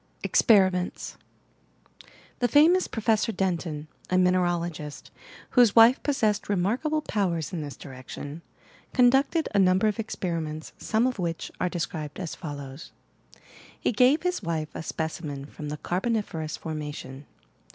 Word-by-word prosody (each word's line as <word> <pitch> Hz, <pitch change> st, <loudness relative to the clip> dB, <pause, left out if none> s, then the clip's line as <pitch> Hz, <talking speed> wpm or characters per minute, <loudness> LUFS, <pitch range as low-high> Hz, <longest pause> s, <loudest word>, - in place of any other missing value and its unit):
EXPEBIMBNT9 185 Hz, -5 st, +3 dB, 1.2 s
The 245 Hz, -, +3 dB
famous 330 Hz, +7 st, +5 dB
Professor 225 Hz, 0 st, +1 dB
Denton, 170 Hz, -6 st, -2 dB, 0.2 s
a 185 Hz, -, +2 dB
mineralogist, 175 Hz, -4 st, 0 dB, 0.4 s
whose 245 Hz, -5 st, +5 dB
wife 230 Hz, +3 st, +7 dB
possessed 215 Hz, -8 st, 0 dB
remarkable 240 Hz, -, 0 dB
powers 180 Hz, -, -1 dB
in 170 Hz, -, -2 dB
this 145 Hz, -4 st, -7 dB
direction, 140 Hz, +3 st, -8 dB, 0.5 s
con 245 Hz, -2 st, +6 dB
ducted 280 Hz, +5 st, +2 dB
a 200 Hz, -, +3 dB
number 185 Hz, +2 st, +4 dB
of 215 Hz, +1 st, 0 dB
experiments 165 Hz, -7 st, -4 dB
some 220 Hz, +2 st, +1 dB
of 255 Hz, -4 st, -1 dB
which 170 Hz, -2 st, -3 dB
are 180 Hz, -, +1 dB
described 160 Hz, -3 st, -4 dB
as 175 Hz, -4 st, -4 dB
follows: 145 Hz, -3 st, -8 dB, 0.9 s
lie -, -, +4 dB
gave 255 Hz, +8 st, +4 dB
his 360 Hz, -6 st, -1 dB
wife 160 Hz, -4 st, -2 dB
a -, -, -5 dB
specimen 155 Hz, -3 st, -4 dB
from 150 Hz, 0 st, -8 dB
the 150 Hz, -, -4 dB
carboniferous 180 Hz, -4 st, -2 dB
formation. 150 Hz, -3 st, -6 dB
180 Hz, 130 wpm, -26 LUFS, 155-225 Hz, 1.2 s, wife